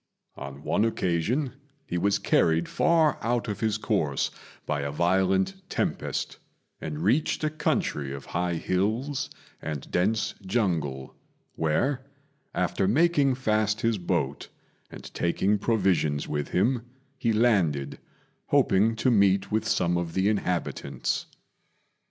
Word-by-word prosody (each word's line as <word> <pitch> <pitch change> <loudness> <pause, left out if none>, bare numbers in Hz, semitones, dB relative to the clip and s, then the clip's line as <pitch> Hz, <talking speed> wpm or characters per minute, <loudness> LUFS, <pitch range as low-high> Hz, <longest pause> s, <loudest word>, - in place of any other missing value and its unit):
On 70 +1 -8
one 105 - +1
occasion 115 - 0 0.3
he 90 - -4
was 100 +2 +2
carried 80 -4 +2
far 160 -3 +3
out 120 +1 0
of 105 - -3
his 110 -2 +1
course - - 0 0.3
by 75 -2 -1
a 70 - -2
violent 95 - +2 0.2
tempest, - - -2 0.4
and 75 +1 -5
reached 130 - +1
a 155 - +1
country 75 - -1
of 70 0 -7
high 85 0 0
hills 110 - -1 0.3
and 75 -3 -5
dense 105 +5 +1
jungle, 85 - -1 0.4
where, 125 - 0 0.5
after 90 +1 +1
making 145 - +3
fast 110 -3 +1
his 115 -3 +1
boat 80 -6 -2 0.4
and - - -11
taking 95 +4 +1
provisions 95 -10 +1
with 75 -1 -2
him, 115 +7 +1 0.4
he 115 - +1
landed, 95 - +2 0.5
hoping 105 +4 +3
to 125 +3 +2
meet 100 -2 +3
with 110 0 0
some 90 -4 +2
of 85 -1 -4
the 95 +2 +3
inhabitants. 90 -5 -2
95 Hz, 125 wpm, -27 LUFS, 85-115 Hz, 0.5 s, far